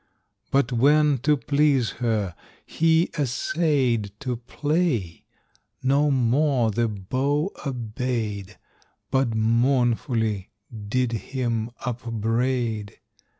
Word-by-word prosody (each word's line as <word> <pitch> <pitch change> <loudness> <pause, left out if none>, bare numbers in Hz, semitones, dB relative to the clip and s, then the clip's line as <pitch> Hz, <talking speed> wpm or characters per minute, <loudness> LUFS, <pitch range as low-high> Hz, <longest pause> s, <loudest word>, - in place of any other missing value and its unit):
But 135 -2 +2
when, 145 +3 +4
to 145 +4 +2
please 140 -3 +2
her, 110 -6 0 0.3
he 165 +1 +2
essayed 130 - +1
To 130 -4 -2
play, 135 - -1 0.6
no 140 +3 +3
more 130 -1 +2
the 115 +3 +1
bow 135 - -1 0.2
obeyed, 110 -5 -3 0.5
But 130 -4 +1
mournfully 115 -2 +1 0.4
did 125 +1 +1
him 115 -1 -2 0.2
upbraid. 115 -2 -1
125 Hz, 85 wpm, -24 LUFS, 115-140 Hz, 0.6 s, when